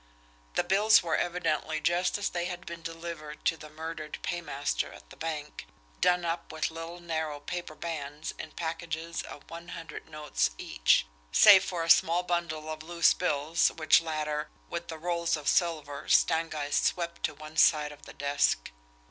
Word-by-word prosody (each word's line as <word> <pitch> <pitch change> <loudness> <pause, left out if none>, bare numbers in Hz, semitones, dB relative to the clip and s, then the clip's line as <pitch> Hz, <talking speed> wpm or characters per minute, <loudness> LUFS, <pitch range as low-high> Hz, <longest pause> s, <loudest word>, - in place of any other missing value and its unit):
The - - +3
bills 200 +4 +5
were 165 -2 +1
evidently 160 -3 0
just 175 +5 +1
as 205 - -1
they 175 -1 -2
had 180 0 -5
been 170 -1 -7
delivered 165 -2 -7
to 165 - +3
the 155 -1 -11
murdered 155 0 -6
paymaster 160 -5 -2
at - - -15
the - - -10
bank, 150 - -5 0.3
done 180 -1 +3
up 165 0 -3
with 160 0 -1
little 165 +2 -7
narrow 160 -3 -3
paper 175 +1 -5
bands 150 -2 -5
in - - -6
packages 165 0 -4
of 145 - -11
one 170 +1 -9
hundred 165 -2 -9
notes 150 - 0
each, - - +3 0.3
save 190 - +9
for 175 -4 -2
a 165 - -4
small 170 +2 +5
bundle 170 -3 -2
of 155 0 -6
loose 170 +1 +3
bills 160 -1 +2
which 155 0 +5
latter, 155 -2 -2 0.2
with 170 0 -4
the 160 - -6
rolls 170 0 0
of 145 -2 -8
silver, 155 -5 0
Stangeist 155 -3 +2
swept 170 -1 -1
to - - -1
one 155 +1 -11
side 150 -2 +5
of 145 - -14
the - - -10
desk. 140 - +1
165 Hz, 170 wpm, -29 LUFS, 150-170 Hz, 0.3 s, save